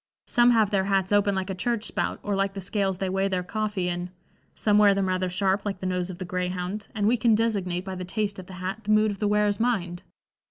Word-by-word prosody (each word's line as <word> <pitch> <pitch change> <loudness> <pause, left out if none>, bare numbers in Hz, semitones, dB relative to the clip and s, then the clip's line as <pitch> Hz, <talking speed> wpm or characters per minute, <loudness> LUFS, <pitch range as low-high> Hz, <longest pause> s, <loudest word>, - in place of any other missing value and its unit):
Some 240 0 +4
have 220 -3 +3
their 195 -2 +2
hats 195 -1 +1
open 205 -1 +3
like 190 0 -2
a - - -2
church 225 +3 -1
spout - - -2
or 205 -1 -1
like 195 0 0
the - - -4
scales 195 0 -1
they 190 - -2
weigh 195 +1 0
their 185 -2 -1
coffee 205 -1 -2
in; 175 0 -3 0.5
some 210 -1 +3
wear 205 -2 +6
them 195 -1 0
rather 185 0 0
sharp 190 +2 0
like 195 -3 -3
the 190 - -6
nose 180 0 -1
of 180 - -7
the 185 - -5
greyhound, 180 +3 -3
and 205 -2 0
we 235 +4 +3
can 225 -1 +4
designate 195 -5 -1
by 190 - -5
the 185 0 -5
taste 200 +2 -2
of 185 - -10
the 190 - -10
hat 190 +4 -5
the - - -6
mood 215 0 +4
of 200 - -7
the 210 - +1
wearer's 210 -1 +2
mind. 185 -8 -1
195 Hz, 255 wpm, -26 LUFS, 185-210 Hz, 0.5 s, wear